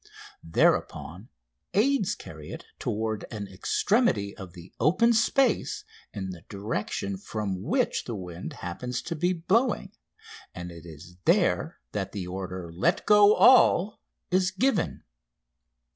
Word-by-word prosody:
Thereupon 90 - 0 0.5
aids 215 -2 +2
carry 75 -1 -11
it - - -8
toward 110 0 -2
an 105 -2 -6
extremity 100 - +1
of 95 -3 -10
the 90 0 -13
open 185 - +4
space 235 +2 +2 0.3
in 95 -2 -5
the 90 -2 -10
direction 100 -1 -3
from 100 -2 -4
which - - 0
the 115 - -4
wind 90 -2 -7
happens 125 +8 -4
to 170 - -4
be 175 +3 +1
blowing, 195 +9 +1 0.6
and 90 0 -6
it 85 0 -11
is 85 +2 -12
there - - +2
that - - -4
the 95 -3 -4
order: 90 -1 -6
"Let 90 - +1
go 210 0 +7
all!" 215 -5 +5 0.3
is 185 0 +3
given. 195 0 0
105 Hz, 130 wpm, -27 LUFS, -, 0.6 s, go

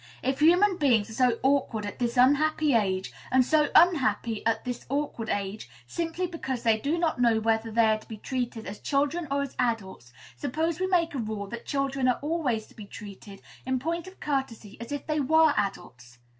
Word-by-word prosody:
If 265 +1 -1
human 355 +5 +5
beings 235 -8 +2
are 250 +3 +3
so 230 - -2
awkward 265 -6 +1
at 205 - -7
this 240 0 -1
unhappy 290 +3 +3
age, 190 -4 0 0.2
and 255 -1 +4
so 300 +1 +3
unhappy 235 - +3
at 225 +1 0
this 245 -1 -5
awkward 275 -5 -2
age, 200 - -3 0.2
simply 335 - -3
because 270 -8 -4
they 225 -2 +3
do 290 +9 -1
not 325 -7 0
know 230 -2 +4
whether 225 0 0
they 225 +1 +3
are 215 0 +2
to - - -18
be 220 - -8
treated 240 -1 -4
as 210 - -7
children 290 +4 0
or 280 0 0
as 275 - -7
adults, 205 - -2 0.2
suppose 315 - -2
we 375 - 0
make 345 -4 +1
a 275 - -3
rule 215 -2 -4
that 235 +2 -8
children 275 -2 0
are 250 - +2
always 290 -9 -1
to - - -20
be 210 - -9
treated, 200 -1 -11 0.2
in 260 0 -1
point 335 +6 -3
of 375 - -13
courtesy, 265 -8 -3
as 235 - -8
if 290 - -4
they 305 -1 -1
were 315 +2 +4
adults? 125 - -4
255 Hz, 200 wpm, -27 LUFS, 220-300 Hz, 0.2 s, human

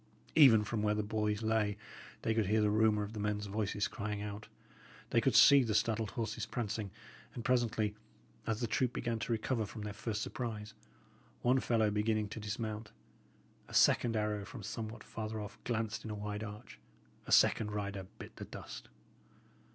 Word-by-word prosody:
Even 125 -9 +8
from 105 +1 -2
where 105 0 +2
the 105 - 0
boys 105 0 -1
lay 110 -2 +1 0.5
they 110 - +2
could 110 -3 +1
hear 110 +2 +3
the 105 -1 +3
rumour 110 -1 +3
of 105 +2 -6
the 110 - -5
men's 105 0 -1
voices 100 0 -1
crying 105 0 -4
out; 105 0 -6 0.6
they - - +4
could - - +2
see 140 -1 +9
the 110 -4 0
startled 110 0 +1
horses 115 -1 -2
prancing, 105 -3 -3 0.5
and, 120 - -6
presently, 115 -4 +1 0.5
as 110 0 -1
the - - +1
troop 125 +2 0
began 115 -2 -2
to 110 - -3
recover 115 +1 0
from 105 +1 -7
their 105 -1 -4
first 110 +1 -3
surprise, 110 -4 -5 0.7
one 125 +2 +4
fellow 110 -4 +2
beginning 105 0 +1
to 110 - -6
dismount. 110 0 -4 0.8
A - - -8
second 115 -2 +5
arrow 105 -1 0
from 110 +1 -9
somewhat 110 +3 -5
farther 110 -1 -5
off 105 +1 -8
glanced 115 -2 -2
in 110 - -6
a 105 - -3
wide 105 +1 -4
arch; 105 +1 -9 0.5
a - - -5
second 105 - +5
rider 100 -2 -4
bit - - -10
the - - -6
dust. - - -9
110 Hz, 180 wpm, -34 LUFS, 105-115 Hz, 0.8 s, see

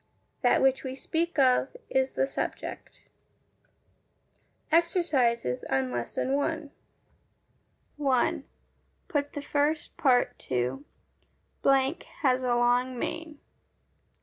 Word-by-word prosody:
That - - +3
which 270 0 +3
we 260 -1 -4
speak 330 +5 -2
of 265 - +3
is 265 0 +1
the - - +1
SUBJECT. 270 - -5 1.7
Exercises 290 - +2
on 130 -1 0
Lesson 120 - -2
I 320 0 -2 1.3
1. 270 -4 +1 0.6
Put 285 -2 -1
the 290 - -5
first 295 +2 0
part 250 -3 +2
to 130 +2 -2 1.4
has 255 -2 +3
a 250 -1 +1
long 245 +1 +2
mane. 320 +3 -4
265 Hz, 95 wpm, -28 LUFS, 245-295 Hz, 1.7 s, That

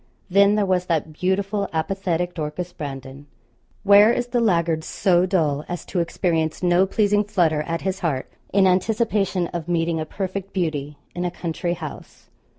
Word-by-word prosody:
Then 200 +2 +5
there 210 -1 +2
was 185 -1 0
that 160 -2 -1
beautiful 195 +4 -1
apathetic 175 +1 -1
Dorcas 165 +3 -5
Brandon. 135 0 -8 0.6
Where 205 +2 +7
is 245 0 -1
the 245 - +1
laggard 170 -7 +1
so 180 -1 +2
dull 155 -6 +1
as 175 -1 -5
to 180 - -2
experience 165 -1 -1
no 180 +2 +4
pleasing 205 0 +2
flutter 175 -7 +1
at 165 0 -2
his 190 0 -2
heart 150 -8 -2 0.2
in 195 0 +4
anticipation 195 -1 +1
of 170 -2 -5
meeting 165 -1 0
a 155 - -2
perfect 195 +1 -5
beauty 150 -5 -2 0.2
in 175 - -3
a 180 - 0
country 175 0 -3
house. 160 -3 -10
180 Hz, 160 wpm, -22 LUFS, 160-195 Hz, 0.6 s, Where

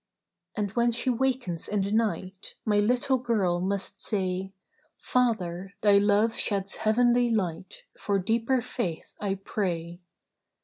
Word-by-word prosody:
"And 205 -2 -1
when 235 +2 +2
she 240 +2 +1
wakens 245 -9 -1
in 205 -2 0
the 200 - -3
night, 205 -4 -2
My 210 -2 +3
little 250 +5 +2
girl 205 -8 +1
must 195 +1 -2
say, 190 -2 -2 0.5
'Father, 195 -6 -1
Thy 205 -1 +6
love 205 +2 +3
sheds 200 -2 0
heavenly 240 +2 +3
light; 185 -5 -2 0.2
For 200 -1 0
deeper 230 +6 +1
Faith 195 -10 -4
I 200 -2 0
pray. 175 -3 -3
205 Hz, 130 wpm, -27 LUFS, 190-235 Hz, 0.5 s, Thy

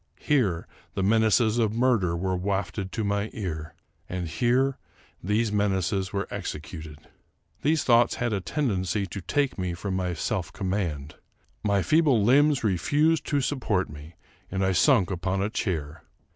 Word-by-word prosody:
Here 110 - +1 0.3
the 95 - 0
menaces 110 +2 +3
of 110 -2 +1
murder 115 -9 +2
were 95 +1 -1
wafted 95 +1 -2
to 110 - -2
my 100 +1 -1
ear; 80 -6 -5 0.3
and 90 -1 -3
here 125 - +1 0.4
these 105 +4 +1
menaces 95 -2 0
were 100 0 -2
executed. 75 0 -6 0.6
These 155 +1 +2
thoughts 120 -1 +4
had 120 -2 -1
a 100 - -1
tendency 100 - -1
to 95 +1 -7
take 140 - 0 0.2
from 100 +2 -4
me 95 - -1
my 90 -1 -1
self 85 0 -2
command. 85 -7 -3 0.5
My 100 -2 +2
feeble 150 -8 +3
limbs 140 +4 +4
refused 145 - +2
to 145 -2 +1
support 115 - -1
me, 75 +3 -11 0.3
and 95 0 -1
I 95 - +2
sunk 100 - +4
upon 95 +1 -1
a 105 - -2
chair. 80 -8 -3
100 Hz, 150 wpm, -26 LUFS, 90-120 Hz, 0.6 s, thoughts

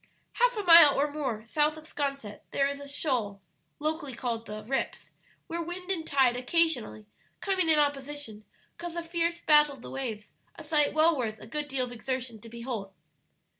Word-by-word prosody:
Half - - +2
a 415 - -1
mile 335 -6 +8
or 290 +1 +1
more 260 -8 -3
south 300 +6 +1
of 310 - -11
'Sconset 275 -9 -3
there 275 - +1
is 280 0 -4
a 285 - -9
shoal 250 -9 -2 0.4
(locally 305 -3 -3
called 230 -2 -3
"the 215 0 -7
rips") 265 +5 -3 0.3
where 340 +1 -4
wind 360 +3 -5
and 325 -4 -2
tide 265 -3 +3
occasionally, 255 -5 0 0.3
coming 375 -4 +1
in 315 - +5
opposition, 285 -6 -2 0.4
cause 345 -1 -5
a 340 - -3
fierce 335 0 -1
battle 300 -2 +5
of 245 - -16
the - - -8
waves, 225 -6 -5 0.2
a - - -10
sight 300 -2 +1
well 320 +1 +5
worth 220 -5 -3
a - - -11
good 295 +5 -4
deal 270 -2 -1
of 245 - -10
exertion 245 -1 -4
to 230 - -11
behold. 235 -4 -5
280 Hz, 185 wpm, -29 LUFS, 240-320 Hz, 0.4 s, mile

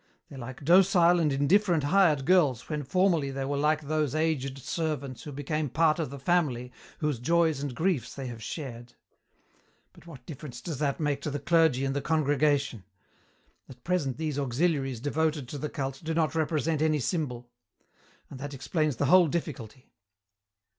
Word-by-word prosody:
They're 135 - -10
like 130 +2 -8
docile 175 0 +5
and 155 -3 +2
indifferent 165 +4 +2
hired 155 -4 +3
girls 145 -9 +3
when 150 -2 -3
formerly 165 0 +1
they 135 0 -3
were 140 +1 -2
like 150 +2 +1
those 150 -1 -1
aged 150 -4 -1
servants 140 -2 -3
who 150 - -8
became 145 +1 -2
part 160 +3 +2
of 160 - -2
the 140 - -8
family 135 -5 0 0.3
whose 150 -5 0
joys 160 +1 +2
and 140 -4 -4
griefs 160 - -1
they 135 - -6
have 120 -3 -7
shared. 120 -1 -7 1.0
But - - -18
what 135 -7 -12
difference 140 -5 -8
does 150 +1 -6
that 140 -2 -1
make 145 -3 -1
to 150 - -3
the 145 - -3
clergy 160 -5 +2
and 135 0 -2
the 140 - -1
congregation? 145 - +1 0.9
At 125 -2 -14
present 160 -8 -1
these 155 -3 -2
auxiliaries 135 -2 0
devoted 150 -1 -1
to 145 - -6
the 150 - -3
cult 135 -1 -4
do 160 0 -2
not 155 -3 +1
represent 160 -1 0
any 155 -1 +2
symbol. 125 -5 -3 0.8
And 135 - -10
that 145 +1 -6
explains 150 +2 -1
the 140 - 0
whole 180 +4 +6
difficulty. 135 -7 -5
145 Hz, 170 wpm, -28 LUFS, 135-160 Hz, 1.0 s, whole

